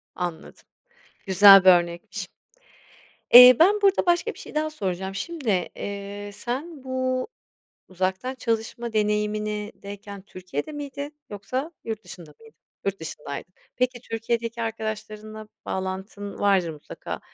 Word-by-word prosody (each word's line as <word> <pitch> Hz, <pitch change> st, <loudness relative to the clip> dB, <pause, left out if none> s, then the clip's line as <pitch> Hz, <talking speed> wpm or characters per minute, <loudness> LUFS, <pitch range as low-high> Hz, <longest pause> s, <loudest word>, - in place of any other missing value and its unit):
Anladım, 175 Hz, -3 st, -6 dB, 0.6 s
güzel 195 Hz, 0 st, +9 dB
bir 190 Hz, -, +8 dB
örnekmiş. 175 Hz, -1 st, +1 dB, 1.0 s
Eee, 250 Hz, +1 st, +12 dB
ben 410 Hz, +5 st, +5 dB
burada 395 Hz, -1 st, +3 dB
başka 345 Hz, -1 st, +2 dB
bir -, -, -15 dB
şey -, -, -11 dB
daha 310 Hz, +1 st, 0 dB
soracağım. 190 Hz, -, -4 dB
Şimdi, 300 Hz, +2 st, -4 dB, 0.3 s
eee, 200 Hz, 0 st, -6 dB
sen 270 Hz, -, -5 dB
bu 255 Hz, 0 st, -1 dB, 0.6 s
uzaktan 190 Hz, +7 st, -2 dB
çalışma 230 Hz, -1 st, -3 dB
deneyimindeyken 210 Hz, -1 st, -2 dB
Türkiye'de 185 Hz, -, -6 dB
miydin 285 Hz, 0 st, -6 dB, 0.2 s
yoksa 255 Hz, -, -4 dB
yurt 220 Hz, -1 st, -5 dB
dışında 170 Hz, -4 st, -11 dB
mıydın? 225 Hz, 0 st, -18 dB, 0.3 s
Yurt 195 Hz, -2 st, -2 dB
dışındaydın. 150 Hz, +1 st, -7 dB, 0.2 s
Peki, 250 Hz, -1 st, 0 dB
Türkiye'deki 230 Hz, 0 st, -3 dB
arkadaşlarınla 215 Hz, -1 st, -5 dB, 0.2 s
bağlantın 190 Hz, +2 st, -5 dB
vardır 195 Hz, -4 st, +2 dB
mutlaka, 150 Hz, -2 st, -8 dB
215 Hz, 115 wpm, -25 LUFS, 195-250 Hz, 1.0 s, Eee